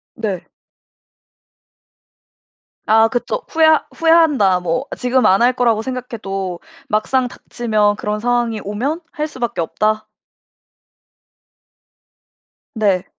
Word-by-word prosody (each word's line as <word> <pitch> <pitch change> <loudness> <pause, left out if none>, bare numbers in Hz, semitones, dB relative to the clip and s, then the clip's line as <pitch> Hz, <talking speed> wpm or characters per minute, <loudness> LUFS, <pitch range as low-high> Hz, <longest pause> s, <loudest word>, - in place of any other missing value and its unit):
네. 205 -6 -3 2.4
아 220 +1 +5
그쵸. 245 - -2
후회 320 -1 +3 0.3
"후회한다." 310 - +4
뭐 180 +9 -2
지금 250 -1 +1
안 195 0 +4
할 245 +2 +4
거라고 235 -3 +1
생각해도 210 -8 -5 0.3
막상 250 +4 +1
닥치면 215 -4 -1
그런 210 0 -3
상황이 240 -1 0
오면 255 - -3
"할 305 -1 -3
수밖에 245 - -3
없다." 215 +5 -1 2.7
네. 200 -5 +1
225 Hz, 185 characters per minute, -18 LUFS, 205-255 Hz, 2.7 s, 아